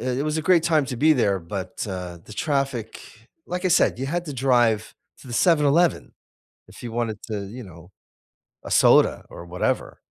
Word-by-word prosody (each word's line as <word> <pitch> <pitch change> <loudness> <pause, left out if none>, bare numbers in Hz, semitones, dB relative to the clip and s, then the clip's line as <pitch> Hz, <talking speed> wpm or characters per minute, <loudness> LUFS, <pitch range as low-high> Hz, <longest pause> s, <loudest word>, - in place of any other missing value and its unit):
it 130 +3 -1
was 155 +1 -1
a - - -2
great 170 0 +4
time 155 -4 +2
to 125 - -5
be 155 +5 +4
there 100 -8 +1
but, 95 +3 -6
uh, 90 -2 -6
the 110 - -12
traffic, 135 -4 -2 0.5
like 180 +1 -4
I 185 - +3
said, 170 -7 +3
you 135 - -3
had 175 +4 -2
to 150 - -5
drive 120 -5 +1 0.3
to - - -15
the 120 - -7
7-Eleven, 165 +3 +2 0.6
if - - -14
you 120 - -6
wanted 115 -2 -2
to, 105 -3 -4
you 120 +5 -9
know 90 -2 -14 0.7
a - - -9
soda - - +4
or 85 - -10
whatever. 90 +1 -2
125 Hz, 190 wpm, -23 LUFS, 105-155 Hz, 0.7 s, great